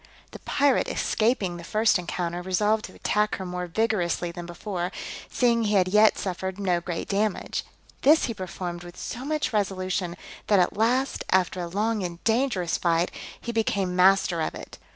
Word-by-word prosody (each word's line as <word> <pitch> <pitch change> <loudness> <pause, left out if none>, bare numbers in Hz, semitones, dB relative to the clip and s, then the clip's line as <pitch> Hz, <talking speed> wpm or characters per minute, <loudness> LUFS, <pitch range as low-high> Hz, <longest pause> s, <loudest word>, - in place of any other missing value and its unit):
The - - -9
pirate 280 -2 +2
escaping 215 -6 0
the 170 - -9
first 215 +2 +2
encounter, 175 +1 -3
resolved 210 +4 +1
to - - -12
attack 210 0 +1
her 190 - -6
more 180 0 -4
vigorously 175 -3 0
than 170 0 -8
before, 175 0 -4 0.4
seeing 235 -2 +2
he 210 0 +1
had 185 -2 +4
yet 210 +3 +5
suffered 190 0 -3
no 180 -3 +1
great 170 -1 -4
damage: 205 0 -1 0.4
this 305 +4 +5
he 230 - -3
performed 180 -3 -5
with 175 0 -11
so 245 - -5
much 300 -3 -1
resolution, 185 -3 -1 0.3
that 205 - +4
at 180 +2 +2
last, 245 +6 +1
after 185 0 +2
a 175 - -3
long 210 +4 0
and 175 -2 -4
dangerous 225 -7 +1
fight, 170 0 +1 0.3
he 235 - -4
became 200 -5 0
master 185 -2 +4
of - - -2
it. - - -10
190 Hz, 175 wpm, -26 LUFS, 175-220 Hz, 0.4 s, yet